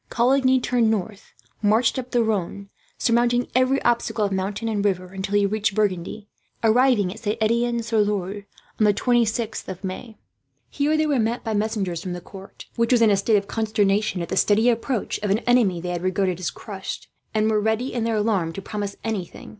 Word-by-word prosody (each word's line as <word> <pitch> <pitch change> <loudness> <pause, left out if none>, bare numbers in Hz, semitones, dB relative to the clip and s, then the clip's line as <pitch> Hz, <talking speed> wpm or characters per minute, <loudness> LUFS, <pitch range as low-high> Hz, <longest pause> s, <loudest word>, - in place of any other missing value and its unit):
Coligny 260 +2 +3
turned 240 -2 +1
north, 215 0 -3 0.3
marched 220 +4 +2
up 250 0 -6
the 240 -2 +2
Rhone, 200 -2 -2 0.3
surmounting 240 +1 +2
every 255 +2 +3
obstacle 235 -2 +1
of 200 - -2
mountain 195 +4 -2
and 210 -3 -1
river; 185 -2 -1
until 195 +1 -3
he 205 -1 +4
reached 210 0 0
Burgundy, 205 0 -1 0.4
arriving 225 -4 +3
at 220 - -12
Saint 215 0 -2
Etienne 235 +1 +1
sur 225 -1 0
Loire 205 -1 -1 0.3
on 215 - +4
the 205 -1 +4
26th 230 -2 0
of 185 +1 -7
May. 205 +4 -6 0.5
Here 295 +2 +1
they 310 - +2
were 290 -4 +1
met 230 +2 -1
by 225 - -2
messengers 205 -5 -1
from 180 0 -5
the 175 - -5
court, 195 +2 -12
which 230 +1 +1
was 240 -2 +5
in 220 - +5
a - - +5
state 205 +3 +2
of 200 0 -2
consternation 210 -4 0
at - - -7
the - - -2
steady 220 +3 +4
approach 230 0 -2
of 205 - -2
an 200 - +3
enemy 235 -8 +3
they 180 +1 -5
had 175 -1 -3
regarded 185 -1 0
as 185 - -2
crushed; 195 -3 -7 0.3
and 215 0 +2
were 210 -1 +2
ready, 220 +5 -1
in 235 - -1
their 230 -1 0
alarm, 205 -6 0
to 195 - -6
promise 205 -2 -4
anything. 210 -6 -5
215 Hz, 200 wpm, -23 LUFS, 195-235 Hz, 0.5 s, was